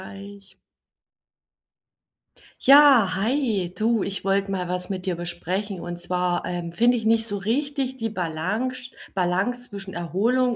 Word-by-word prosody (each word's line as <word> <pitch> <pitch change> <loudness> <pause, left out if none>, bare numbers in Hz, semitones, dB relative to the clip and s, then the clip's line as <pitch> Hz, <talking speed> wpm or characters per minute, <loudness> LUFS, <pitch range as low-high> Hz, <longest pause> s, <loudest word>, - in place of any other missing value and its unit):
eich. 200 0 -12 2.1
Ja, 275 -9 +7
hi. 215 -4 0
Du, 225 -1 +1
ich 200 -1 -4
wollte 195 0 +1
mal 185 -2 -2
was 180 0 -2
mit 190 -1 -4
dir 180 - 0
besprechen. 175 +3 -3
Und 175 0 -6
zwar, 180 0 -1
ähm, 175 -1 -4
finde 235 +8 +3
ich 225 -2 -3
nicht 225 0 +3
so 205 -3 -3
richtig 265 +5 -1
die 225 -2 -2
Balance 210 +9 -3 0.2
Balance 195 +7 0
zwischen 195 -2 -7
Erholung 230 +9 +1
200 Hz, 135 wpm, -24 LUFS, 180-240 Hz, 2.1 s, Ja